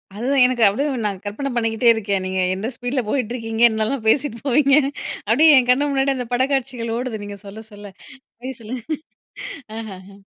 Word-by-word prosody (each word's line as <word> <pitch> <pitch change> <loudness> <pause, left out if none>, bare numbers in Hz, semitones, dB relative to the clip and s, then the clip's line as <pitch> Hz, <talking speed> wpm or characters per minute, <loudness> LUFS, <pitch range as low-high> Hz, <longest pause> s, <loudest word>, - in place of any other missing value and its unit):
அதுதான் 255 +4 +2
எனக்கு 250 -2 +1
அப்டியே 270 +9 0 0.2
நான் 195 -2 -3
கற்பனை 245 +7 -4
பண்ணிக்கிட்டே 225 0 +2
இருக்கேன். 200 -3 -2
நீ - - -3 0.3
எந்த 205 +4 -4
ஸ்பீட்ல 245 +2 -2
போயிட்டு 245 -3 -1
இருக்கீங்க? 225 -1 -4
என்னலாம் 220 +2 -2
பேசிட்டு 235 -1 +2
போவீங்க? 275 +1 +4 0.5
அப்டியே 305 +7 +6
என் 250 0 -2
கண்ணு 285 +3 +3
முன்னாடி 270 0 +1
அந்த 250 -2 -4
படக்காட்சிகள் 255 -3 -1
ஓடுது. 245 -4 -4
நீங்க 205 0 -8
சொல்ல 215 +3 -9
சொல்ல 205 -1 -11 0.7
சொல்லுங்க. 235 +2 -6 0.9
அஹஹ 200 -3 -9
235 Hz, 155 wpm, -21 LUFS, 215-265 Hz, 0.9 s, அப்டியே